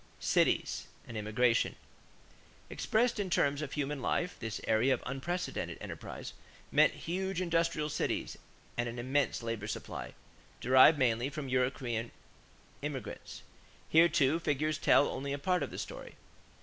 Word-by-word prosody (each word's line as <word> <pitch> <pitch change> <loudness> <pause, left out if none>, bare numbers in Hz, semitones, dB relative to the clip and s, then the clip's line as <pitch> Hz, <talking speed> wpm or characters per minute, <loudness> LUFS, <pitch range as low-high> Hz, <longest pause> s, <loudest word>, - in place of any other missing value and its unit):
=Cities - - +1 0.2
and 120 - -8
Immigration.= 115 +3 +2 1.0
Expressed 235 +1 +1
in 200 -2 -1
terms 145 -4 +2
of 145 -2 -5
human 145 -1 -2
life, 180 +7 0
this 110 -2 -4
era 110 +3 +2
of 130 - +1
unprecedented 175 +8 -3
enterprise - - -7 0.4
meant - - +5
huge 190 +2 -2
industrial 165 -3 +1
cities 150 - -2 0.4
and 120 0 0
an 120 - -7
immense 130 +1 0
labor 115 -2 -3
supply, - - -6 0.4
derived 130 +5 +7
mainly 120 -1 +2
from 145 -2 -5
European 125 -2 0 0.7
immigration. 140 -5 -6 0.5
Here, 165 +2 +6
too, 155 -1 +3
figures 155 -1 0
tell 145 - +5
only 140 +1 -3
a - - -2
part 180 +4 +1
of 140 - -2
the - - -8
story. - - -7
140 Hz, 135 wpm, -32 LUFS, 125-165 Hz, 1.0 s, derived